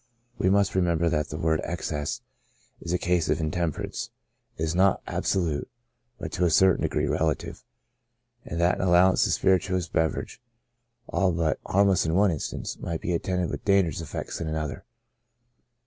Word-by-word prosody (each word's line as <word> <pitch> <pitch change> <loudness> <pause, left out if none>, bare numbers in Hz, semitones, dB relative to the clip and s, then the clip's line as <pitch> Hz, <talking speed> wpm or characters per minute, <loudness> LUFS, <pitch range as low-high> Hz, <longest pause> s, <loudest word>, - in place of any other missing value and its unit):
We 95 - +2
must 100 0 +3
remember 85 -2 +2
that 75 -2 0
the 75 - -5
word 80 -1 +1
excess^ 75 -3 -3 0.6
in 85 +1 -1
cases 90 -2 0
of 80 - -1
intempe 85 -1 -1
rance, - - -5 0.5
is 80 0 -1
not 95 +2 +2
absolute^ 85 -6 -1 0.5
but - - -6
to 90 - -1
a - - +3
certain 95 +3 +4
degree 75 - 0
relative^ 75 +1 -1 0.8
and 85 - -5
that 85 +1 +2
an 95 - +1
allowance 90 +1 +5
of - - -3
a - - +2
spirituous 95 -1 +1
beverage 80 -1 -1 0.7
all 95 -2 +1
but 80 -3 0
harmless 100 -1 +3
in 80 - 0
one 100 0 +4
instance, 80 - -4
might 85 -1 -4
be 90 - -1
attended 90 +1 -1
with - - -5
dangerous 95 -6 +2
effects 80 - -5
in 80 - -3
another. 80 -2 -4
85 Hz, 165 wpm, -26 LUFS, 80-95 Hz, 0.8 s, allowance